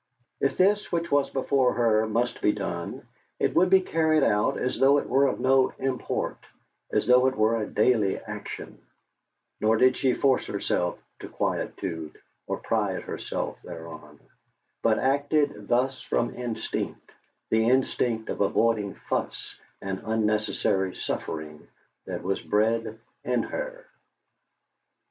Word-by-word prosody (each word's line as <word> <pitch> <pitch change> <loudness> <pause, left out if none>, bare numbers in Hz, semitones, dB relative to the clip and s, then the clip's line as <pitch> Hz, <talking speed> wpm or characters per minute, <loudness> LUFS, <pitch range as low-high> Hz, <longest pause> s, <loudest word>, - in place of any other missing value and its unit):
If 140 - 0
this 205 +3 +3
which 170 -1 -1
was 140 -1 +3
before 135 -1 +2
her 110 -2 +2
must 120 +3 -1
be 105 - +4
done, 85 -4 -5 0.3
it - - 0
would 180 +1 +4
be 190 0 +6
carried 160 -4 +2
out 105 0 +2
as 125 - -2
though 140 +2 +6
it - - -1
were 140 +1 +4
of - - -2
no 130 0 +3
import, 130 -1 -2 0.5
as - - +1
though 125 +1 +5
it 130 - 0
were 110 +1 +2
a 105 - -3
daily 105 -3 +2
action; - - -8 0.8
nor 110 +1 +3
did 130 +2 +5
she 130 -2 +1
force 135 -2 +2
herself 90 0 -1 0.2
to - - -8
quietude, 80 -5 -3 0.3
or - - -2
pride - - -1
herself - - -4
thereon, 80 -4 -10 0.6
but 110 -1 +3
acted 145 -4 +1
thus 130 +2 +1
from 120 - -1
instinct, 120 -2 -4 0.4
the 110 +1 +3
instinct 120 -3 +1
for - - +1
avoiding 105 -1 +1
fuss - - -4 0.3
and 95 -1 -3
unnecessary 105 -3 0
suffering 75 -1 -5 0.4
that - - -5
was 95 +1 -1
bred 110 +1 0 0.3
in 125 -1 0
her. - - -5
115 Hz, 135 wpm, -26 LUFS, 105-135 Hz, 0.8 s, be